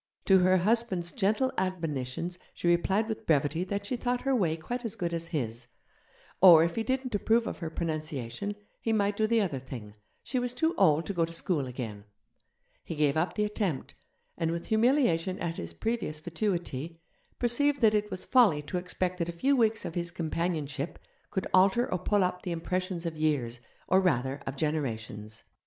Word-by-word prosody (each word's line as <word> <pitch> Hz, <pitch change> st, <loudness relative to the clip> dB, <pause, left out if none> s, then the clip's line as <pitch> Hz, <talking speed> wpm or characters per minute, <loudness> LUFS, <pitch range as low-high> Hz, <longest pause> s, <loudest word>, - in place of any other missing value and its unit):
To 190 Hz, -1 st, +6 dB
her 185 Hz, +1 st, +4 dB
husband's 190 Hz, -3 st, +1 dB
gentle 235 Hz, +5 st, +1 dB
admonitions 170 Hz, -2 st, -3 dB, 0.2 s
she -, -, -3 dB
replied 190 Hz, +5 st, +2 dB
with 220 Hz, -1 st, -5 dB
brevity 150 Hz, +2 st, +2 dB
that 200 Hz, +1 st, -3 dB
she 250 Hz, -, -1 dB
thought 245 Hz, 0 st, -1 dB
her 270 Hz, 0 st, +1 dB
way 170 Hz, -8 st, +1 dB
quite 245 Hz, +10 st, -5 dB
as 225 Hz, -2 st, -4 dB
good 175 Hz, -5 st, -2 dB
as 165 Hz, 0 st, -3 dB
his; 120 Hz, -7 st, -3 dB, 0.7 s
or, 170 Hz, -4 st, +9 dB
if 170 Hz, 0 st, -1 dB
he 225 Hz, -, 0 dB
didn't 260 Hz, +1 st, -2 dB
approve 225 Hz, +3 st, +2 dB
of -, -, -5 dB
her 165 Hz, -3 st, -4 dB
pronunciation, 155 Hz, -, -4 dB, 0.3 s
he 225 Hz, -, 0 dB
might 205 Hz, -1 st, +1 dB
do 215 Hz, +1 st, +1 dB
the 230 Hz, 0 st, +3 dB
other 165 Hz, -10 st, -1 dB
thing, 120 Hz, -5 st, -9 dB, 0.3 s
she 255 Hz, -, -1 dB
was 245 Hz, 0 st, -2 dB
too 320 Hz, +6 st, +1 dB
old 160 Hz, -4 st, +4 dB
to 200 Hz, -, -3 dB
go 170 Hz, -3 st, +1 dB
to 165 Hz, -, -2 dB
school 165 Hz, -4 st, -1 dB
again. 115 Hz, -5 st, -6 dB, 0.8 s
He 165 Hz, -, -5 dB
gave 150 Hz, -2 st, +2 dB
up 160 Hz, +3 st, 0 dB
the 210 Hz, -, +1 dB
attempt, 205 Hz, -, -2 dB, 0.5 s
and, 165 Hz, -, +1 dB
with 170 Hz, +1 st, -4 dB
humiliation 220 Hz, -, +2 dB
at 165 Hz, -1 st, -3 dB
his 85 Hz, 0 st, -4 dB
previous 185 Hz, -, -2 dB
fatuity, 170 Hz, -3 st, -3 dB, 0.4 s
perceived 280 Hz, +4 st, +2 dB
that 220 Hz, -2 st, +5 dB
it 210 Hz, 0 st, +1 dB
was 185 Hz, -2 st, -5 dB
folly 210 Hz, -, +4 dB
to 180 Hz, +5 st, -3 dB
expect 180 Hz, 0 st, -3 dB
that 170 Hz, 0 st, -1 dB
a -, -, -1 dB
few 265 Hz, +12 st, +2 dB
weeks 225 Hz, -3 st, +2 dB
of -, -, -4 dB
his 175 Hz, 0 st, -2 dB
companionship 160 Hz, -3 st, -2 dB, 0.3 s
could 190 Hz, -2 st, -2 dB
alter 195 Hz, +6 st, +5 dB
or 185 Hz, -, 0 dB
pull 205 Hz, +2 st, +2 dB
up 180 Hz, 0 st, -1 dB
the 180 Hz, -, -4 dB
impressions 180 Hz, +1 st, -2 dB
of 160 Hz, -2 st, -4 dB
years, 130 Hz, -7 st, 0 dB, 0.3 s
or 190 Hz, -, +4 dB
rather 135 Hz, -6 st, 0 dB
of 135 Hz, -, -3 dB
generations. 110 Hz, -8 st, -3 dB
175 Hz, 190 wpm, -29 LUFS, 155-210 Hz, 0.8 s, or